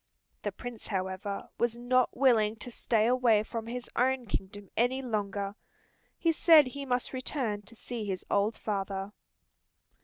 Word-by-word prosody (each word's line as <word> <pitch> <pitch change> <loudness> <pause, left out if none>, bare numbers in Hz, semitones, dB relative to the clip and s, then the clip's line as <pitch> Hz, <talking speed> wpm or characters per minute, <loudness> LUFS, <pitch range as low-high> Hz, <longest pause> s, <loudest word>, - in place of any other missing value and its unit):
The - - -2
Prince, 245 -3 -8
however, 190 0 -3
was 235 0 +1
not 250 +1 +2
willing 225 -5 +4
to 245 +3 -8
stay 225 -1 +1
away 240 -3 +4
from 225 0 -5
his 245 +1 -5
own 255 0 +2
kingdom 200 -1 -5
any 245 +3 +2
longer. 200 -4 -2 0.6
He 335 - +3
said 320 -2 +7
he 275 +2 -6
must 250 +1 0
return 255 -5 -2
to 215 +3 -14
see 235 0 -5
his 190 -2 -3
old 205 +2 +1
father. 195 -1 -3
230 Hz, 150 wpm, -30 LUFS, 205-250 Hz, 0.6 s, said